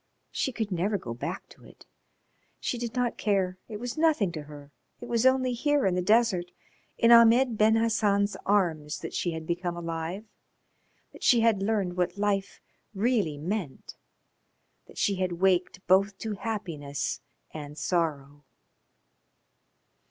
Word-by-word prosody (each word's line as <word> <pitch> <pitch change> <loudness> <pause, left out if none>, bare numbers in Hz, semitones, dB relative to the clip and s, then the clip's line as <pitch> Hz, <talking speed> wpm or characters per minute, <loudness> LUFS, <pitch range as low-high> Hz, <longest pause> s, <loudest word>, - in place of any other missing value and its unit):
She 265 - -1
could 220 -4 -4
never 190 +4 0
go 120 -10 -6
back 120 - -5
to - - -18
it. - - -17 0.7
She 245 - -3
did 235 0 -5
not 245 -2 -1
care. 190 -3 0
It 210 -2 -6
was 245 +5 -5
nothing 300 - +2
to 160 -3 -6
her. 145 -1 -12 0.3
It - - -8
was 235 +1 +2
only 260 -1 +2
here 290 +3 +1
in 190 - +2
the 180 - 0
desert, 195 -3 +2 0.5
in 230 - +4
Ahmed 235 +1 +6
Ben 215 +1 +4
Hassan's 210 -3 +1
arms, 165 -7 0
that - - -6
she 175 - -1
had 160 0 -6
become 175 +1 -3
alive, 165 +4 -4 0.9
that - - -14
she 240 -2 +4
had 225 -4 +3
learned 195 -4 -1
what 180 +2 -1
life 200 -1 -1 0.4
really 205 - +1
meant, 170 -1 -4 0.9
that - - -16
she 200 -2 +1
had 185 -1 -1
waked 180 +1 +1
both 195 +2 +3
to 220 +1 -4
happiness 175 -10 -4 0.3
and 150 -1 -8
sorrow. 145 -3 -2
195 Hz, 150 wpm, -27 LUFS, 170-225 Hz, 0.9 s, Ahmed